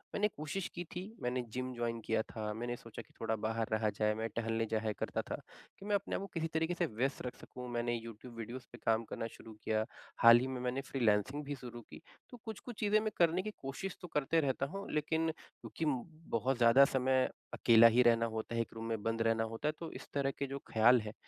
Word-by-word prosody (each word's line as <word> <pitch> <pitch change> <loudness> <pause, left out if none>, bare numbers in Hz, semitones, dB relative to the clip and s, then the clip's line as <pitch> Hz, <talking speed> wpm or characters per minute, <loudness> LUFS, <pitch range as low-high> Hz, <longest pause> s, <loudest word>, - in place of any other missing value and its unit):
मैंने 210 - +3
कोशिश 155 +5 -3
कि 175 - -3
थी। 180 - -2 0.2
मैंने 125 +1 0
जिम 130 0 -3
जॉइन 120 -1 -2
किया 110 0 +2
था। 110 -1 -4
मैंने 120 +2 -3
सोचा 115 -2 -9
कि - - -21
थोड़ा 110 0 0
बाहर 110 +1 -1
रहा 110 0 +2
जाए। 105 -1 +3
मैं 110 +1 -2
टहलने 115 0 0
जाया 110 -1 +1
करता - - -1
था - - -1 0.4
कि 195 - -10
मैं 205 0 +2
अपने 200 - -1
आप - - -2
को 200 - -5
किसी 165 -1 -1
तरीके 160 +2 +1
से 175 - +1
व्यस्त 125 +5 -1
रख 125 - -4
सकूँ। 125 -1 -8
मैंने 120 0 0
यूट्यूब 115 +1 -8
वीडियोज़ 120 +3 -6
पे 120 - -10
काम 115 0 +3
करना 115 - -3
शुरू 110 - -11
किया। 110 0 +1 0.4
हाल 115 0 +10
ही 130 - -1
में 130 -1 -4
मैंने 125 +2 -1
फ्रीलांसिंग 125 +3 +2
भी 145 0 -3
शुरू 120 -2 -8
की। - - -11 0.3
तो 245 - -10
कुछ-कुछ 220 +1 -7
चीज़ें 210 0 +4
मैं 215 0 -1
करने 170 +1 +4
की 215 - -4
कोशिश 140 +8 -4
तो 180 - -7
करते 150 +3 +2
रहता 135 -1 0
हूँ, 200 - -6
लेकिन 160 +2 +1
क्योंकि 160 0 -7
म 135 -5 +1 0.3
बहुत 125 +3 +1
ज़्यादा 120 +3 +7
समय 130 -1 +2 0.2
अकेला 115 -1 +7
ही 115 +2 +5
रहना 115 -1 +5
होता 110 +1 -3
है, 115 - +2
1 115 - -5
रूम 115 0 -6
में 110 -2 -1
बंद 115 0 0
रहना 115 0 +3
होता 115 +6 -3
है, - - +3
तो 165 - -5
इस - - -8
तरह 140 -1 +1
के 140 - 0
जो 135 +1 -4
ख़्याल 115 +2 +6
हैं, 105 0 -6
125 Hz, 235 wpm, -34 LUFS, 115-145 Hz, 0.4 s, हाल